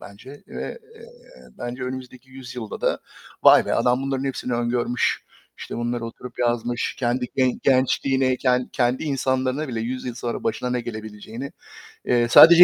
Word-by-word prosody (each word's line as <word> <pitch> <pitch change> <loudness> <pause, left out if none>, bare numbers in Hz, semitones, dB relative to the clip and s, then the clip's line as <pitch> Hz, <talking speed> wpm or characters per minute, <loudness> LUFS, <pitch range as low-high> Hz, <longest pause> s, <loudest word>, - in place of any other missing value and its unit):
bence 130 - -12
ve, 225 - -5 0.2
eee, 465 +1 -13 0.5
bence 120 +1 -5
önümüzdeki 130 0 -7
yüzyılda 125 -4 -7
da - - +1 0.4
vay - - +8
be, - - +1
adam 125 +2 +2
bunların 135 0 -1
hepsini 130 -2 -2
öngörmüş, 120 0 0 0.3
işte, - - -6
bunları 120 0 -2
oturup, 115 +1 -9
yazmış, 120 0 0
kendi 125 0 0
gen 130 -2 +2
gençliğine 130 0 +3
ken 125 -1 +1
kendi 125 0 +1
insanlarına 135 0 0
bile 115 -3 -3
yüzyıl 125 +1 -3
sonra 120 0 -4
başına 125 +2 -1
ne 125 - 0
gelebileceğini, 110 +3 -7 0.5
eee, 120 -1 +3
sadece 170 +7 +11
125 Hz, 145 wpm, -23 LUFS, 120-130 Hz, 0.5 s, sadece